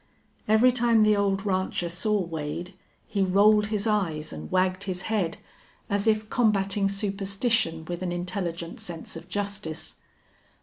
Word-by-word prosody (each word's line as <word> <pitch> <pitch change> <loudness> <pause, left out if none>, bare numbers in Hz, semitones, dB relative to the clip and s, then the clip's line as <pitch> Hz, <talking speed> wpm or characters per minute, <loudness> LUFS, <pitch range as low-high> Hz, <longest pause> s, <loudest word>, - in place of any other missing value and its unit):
Every 220 +4 +5
time 235 -3 +3
the 215 0 +5
old 200 0 0
rancher 185 -2 0
saw 205 +5 0
Wade 165 +2 -5 0.3
he 200 - -2
rolled 205 +3 +4
his 215 -1 -1
eyes 175 - 0
and 75 0 -7
wagged 185 +1 +1
his 185 -2 -4
head, 200 -7 -1 0.5
as 200 +1 +1
if 215 -1 +2
combating 200 -4 +2
superstition 195 -3 0
with 175 +2 -5
an 180 -1 -2
intelligent 175 -1 -4
sense 175 -8 -6
of 165 - -10
justice. 200 -6 -3
195 Hz, 140 wpm, -26 LUFS, 175-210 Hz, 0.5 s, Every